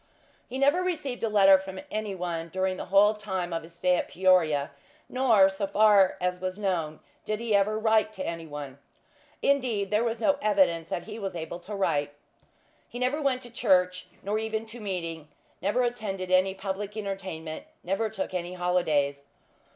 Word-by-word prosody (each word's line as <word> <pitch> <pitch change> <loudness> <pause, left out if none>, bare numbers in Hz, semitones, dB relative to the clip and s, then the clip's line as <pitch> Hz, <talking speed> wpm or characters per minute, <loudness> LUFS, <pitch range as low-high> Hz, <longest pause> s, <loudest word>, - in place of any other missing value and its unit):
He 255 - -4
never 285 +6 +3
received 300 -10 -3
a 225 - +1
letter 195 -2 +6
from 190 0 -7
any 215 -2 -3
one 170 -2 -4
during 185 +1 -1
the - - -5
whole 200 +3 +5
time 190 -5 -4
of 165 - -2
his 165 +1 -14
stay 180 +1 +2
at - - -2
Peoria; 165 -6 +2 0.4
nor, 235 -7 +4
so 195 +1 -2
far 200 -2 +5
as 180 0 -1
was 185 +1 -3
known, 170 -7 -2 0.2
did 215 0 -2
he 230 -3 0
ever 205 +2 +2
write 220 0 +2
to 190 -2 -5
any 165 -1 -5
one. 145 -2 -7 0.6
Indeed, 245 -8 +1
there 210 +2 +3
was 230 -1 -1
no 280 +5 +2
evidence 185 -7 +2
that 175 - -3
he 220 +1 -8
was 195 -3 -4
able 165 +1 -5
to 200 +4 -7
write. 145 -7 0 0.7
He - - -8
never 255 +5 0
went 265 -2 0
to 240 - -12
church, 180 -6 +2 0.2
nor 210 +2 -1
even 220 0 -3
to 225 +2 -10
"meeting;" 165 -6 -4 0.3
never 205 +7 +1
attended 200 -6 -3
any 185 +1 +3
public 195 +2 -5
entertainment; 190 -6 -5 0.2
never 195 +5 -1
took 220 +1 -4
any 180 0 -3
holidays. 155 -6 0
195 Hz, 180 wpm, -27 LUFS, 175-220 Hz, 0.7 s, letter